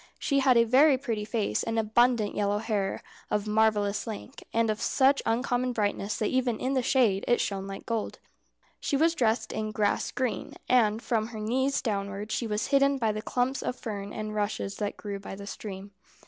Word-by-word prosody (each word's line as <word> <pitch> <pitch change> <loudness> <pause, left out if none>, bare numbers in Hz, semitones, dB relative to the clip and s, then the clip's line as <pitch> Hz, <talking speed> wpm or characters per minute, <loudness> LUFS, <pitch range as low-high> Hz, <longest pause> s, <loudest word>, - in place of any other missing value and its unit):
She 280 -1 +1
had 260 -3 +4
a 230 - +7
very 265 +4 +5
pretty 230 -5 -3
face, 210 - -1
and 225 0 -2
abundant 225 0 +2
yellow 205 0 0
hair 210 -3 -2 0.3
of 210 0 0
marvellous 210 -1 +1
length, 225 +4 -7
and 230 -1 +2
of 215 +1 -4
such 275 +3 +3
uncommon 245 +2 0
brightness 205 -1 -1
that 215 - 0
even 255 -3 +1
in 260 +2 -1
the 260 - +2
shade 230 -6 +2
it 240 - +3
shone 195 -1 -2
like 195 0 -7
gold. 230 -2 -2 0.6
She 280 - 0
was 325 +3 +3
dressed 235 -6 +1
in 215 0 -2
grass 210 -2 0
green, 255 -2 -3
and 225 -3 +3
from 220 -2 0
her 225 -2 -8
knees 260 +6 0
downwards 200 -1 -3
she 235 - -1
was 210 +2 -2
hidden 275 0 +4
by 225 -4 +1
the 215 0 -4
clumps 250 +4 -1
of - - -2
fern 205 -5 -6
and 215 0 -5
rushes 205 -1 -2
that 205 -1 -3
grew 200 -2 -5
by 195 - -8
the 200 +1 -9
stream. 200 -1 -7
220 Hz, 195 wpm, -28 LUFS, 210-250 Hz, 0.6 s, a